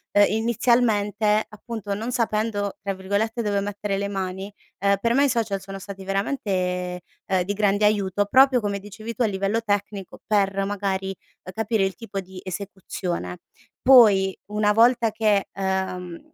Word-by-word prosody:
ehm, 205 0 +7
inizialmente 220 -2 +2
appunto 215 -1 -6
non 225 +5 -3
sapendo 215 -4 -1
tra 200 0 -3
virgolette 205 +5 -1
"dove 205 -2 0
mettere 200 0 -3
le 200 - -1
mani," 190 0 -4 0.3
ehm, 200 0 +3
per 230 +3 +1
me 275 +3 +4
i - - +2
social 215 -5 -1
sono 195 0 -8
stati 195 0 -9
veramente, 185 -4 -2 0.3
ehm, 190 -2 +1
di 200 +3 -2
grande 205 0 +2
aiuto 205 -1 +1
proprio 260 +4 +5
come 200 -1 -2
dicevi 210 +3 -8
tu 250 - -6
a 235 - +4
livello 200 +2 -1
tecnico 205 -2 -3
per, 195 -2 +1
magari, 195 -1 -2 0.3
ehm, 185 - -9
capire 220 -1 0
il 190 - -2
tipo 200 +1 -6
di 190 -1 -9
esecuzione. 180 - -5 0.4
Poi, 205 -7 +6
una 210 0 +1
volta 235 +1 +4
che, 210 -2 +1
ehm, 190 -2 -3
205 Hz, 160 wpm, -24 LUFS, 195-220 Hz, 0.4 s, ehm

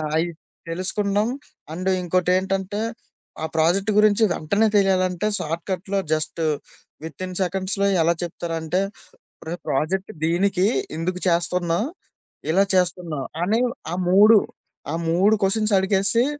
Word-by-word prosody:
అయి 165 +2 +2 0.4
తెలుసుకున్నాం. 200 +4 0 0.5
అండు 185 +3 -1
ఇంకోటి 180 0 +1
ఏంటంటే, 190 +2 -2 0.6
ఆ - - +1
ప్రాజెక్ట్ 185 +6 +2
గురించి 215 +1 +5
వెంటనే 200 +8 +1
తెలియాలంటే, 185 -1 +2
షార్ట్‌కట్‌లో 185 +4 -3
జస్టు, 155 +1 -1 0.6
వితిన్ 180 +4 -6
సెకండ్స్‌లో 190 +2 0
ఎలా 165 +1 +3
చెప్తారంటే, 165 +1 -2 0.6
ఉరేయ్! 170 +2 -5
ప్రాజెక్టు 165 +8 -1
దీనికి, 185 +3 +2 0.3
ఇందుకు 180 +2 -3
చేస్తున్నాం, 175 +2 +1 0.7
ఇలా 195 +4 +4
చేస్తున్నాం 175 -5 0 0.2
అని 220 +6 +2 0.3
ఆ - - -1
3, 210 +3 +7 0.5
ఆ - - 0
3 195 +6 +4
క్వెషన్స్ 215 +2 +1
అడిగేసి, 195 +5 +2
185 Hz, 110 wpm, -23 LUFS, 170-200 Hz, 0.7 s, 3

